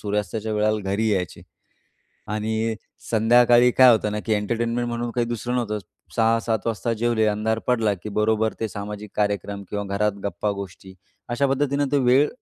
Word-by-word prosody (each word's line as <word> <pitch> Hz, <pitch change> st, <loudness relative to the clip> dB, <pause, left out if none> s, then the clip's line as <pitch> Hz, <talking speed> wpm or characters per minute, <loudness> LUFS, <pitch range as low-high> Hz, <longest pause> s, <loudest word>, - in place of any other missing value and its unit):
सूर्यास्ताच्या 105 Hz, +1 st, -2 dB
वेळेला 105 Hz, 0 st, +1 dB
घरी 110 Hz, +3 st, +1 dB
यायचे 90 Hz, -5 st, -2 dB, 0.9 s
आणि 110 Hz, +1 st, -1 dB, 0.4 s
संध्याकाळी 120 Hz, +2 st, +5 dB
काय 130 Hz, 0 st, +7 dB
होतं 105 Hz, -1 st, +1 dB
ना, 105 Hz, -, -2 dB
की 110 Hz, -, -2 dB
एंटरटेनमेंट 115 Hz, +3 st, -1 dB
म्हणून 120 Hz, 0 st, -3 dB
काही 120 Hz, -1 st, 0 dB
दुसरं 120 Hz, +1 st, -3 dB
नव्हतंच. 105 Hz, -4 st, -2 dB, 0.3 s
6:00-7:00 115 Hz, -1 st, +1 dB
वाजता 115 Hz, +1 st, -1 dB
जेवले 115 Hz, -1 st, +1 dB
अंधार 110 Hz, +1 st, 0 dB
पडला, 115 Hz, -4 st, +2 dB
की 95 Hz, +3 st, -9 dB
बरोबर 110 Hz, +1 st, +1 dB
ते 110 Hz, -, -1 dB
सामाजिक 105 Hz, +1 st, -7 dB
कार्यक्रम 100 Hz, -1 st, -1 dB
किंवा 105 Hz, 0 st, -3 dB
घरात 105 Hz, 0 st, +1 dB
गप्पा-गोष्टी 100 Hz, -2 st, -4 dB, 0.3 s
अशा 120 Hz, +4 st, +1 dB
पद्धतीनं 140 Hz, +1 st, 0 dB
ते 145 Hz, -, +4 dB
वेळ 130 Hz, +3 st, +4 dB
110 Hz, 155 wpm, -23 LUFS, 105-120 Hz, 0.9 s, काय